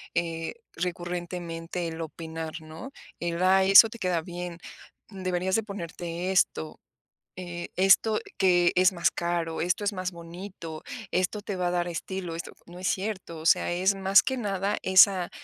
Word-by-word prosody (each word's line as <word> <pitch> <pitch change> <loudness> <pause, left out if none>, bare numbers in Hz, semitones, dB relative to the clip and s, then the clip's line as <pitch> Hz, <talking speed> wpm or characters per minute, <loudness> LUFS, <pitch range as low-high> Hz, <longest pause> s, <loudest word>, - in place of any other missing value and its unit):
eh, 165 -1 -2 0.2
recurrentemente 175 -1 -4
el 165 0 -6
opinar, 160 0 -6
¿no? 160 +12 -10 0.3
El: 170 0 -2
"Ay 190 +1 +4
eso 220 +3 +10
te 235 - -10
queda 180 -4 0
bien, 175 0 -6 0.5
deberías 185 -2 -1
de 225 - +1
ponerte 175 -2 -5
esto". 80 - 0 0.6
Eh: 175 -1 -6
"Esto 195 +3 +4 0.2
que 175 -2 +4
es 185 +2 +5
más 170 -2 +1
caro, 170 -1 -2
esto 180 +4 0
es 205 - 0
más 185 -1 -3
bonito, 170 -1 -9 0.3
esto 185 +3 0
te 205 -1 -5
va 180 -1 -1
a - - 0
dar 175 0 0
estilo, 175 0 -5
esto". 170 - -6
No 175 +1 -12
es 185 - -2
cierto, 190 -4 -3
o 160 - -10
sea, 165 - +4
es 185 +3 +2
más 195 +1 +5
que 265 - -1
nada 200 -2 -1
esa, 185 -1 +6
180 Hz, 165 wpm, -27 LUFS, 170-190 Hz, 0.6 s, eso